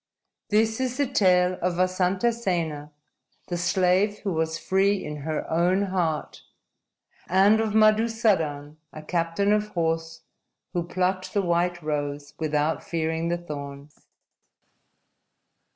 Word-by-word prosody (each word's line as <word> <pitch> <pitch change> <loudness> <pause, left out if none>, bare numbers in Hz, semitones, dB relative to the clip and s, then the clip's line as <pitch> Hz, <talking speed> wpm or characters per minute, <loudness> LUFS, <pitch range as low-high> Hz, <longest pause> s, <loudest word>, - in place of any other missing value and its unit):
_ - - -28
_This 225 +2 -3
is 255 -1 -2
the 285 - +2
tale 185 -7 +2
of 180 0 0
Vasantasena, 185 -4 0 0.6
the 175 - -2
slave 185 +3 +2
who 195 -3 -1
was 160 0 -1
free 195 +3 +2
in 150 0 -5
her 155 +2 -4
own 175 +4 +2
heart, 175 -6 -2 0.9
and 195 +4 +5
of 220 -1 -2
Madusadan, 215 -10 +2
a 155 - -10
captain 170 +5 0
of 210 0 +1
horse, 165 0 -1 0.5
who 175 - 0
plucked 185 +2 -2
the 200 - +2
white 175 0 0
rose 145 -1 -3
without 155 0 0
fearing 160 0 -2
the 175 - 0
thorns. 145 -3 -9
175 Hz, 120 wpm, -25 LUFS, 160-195 Hz, 0.9 s, and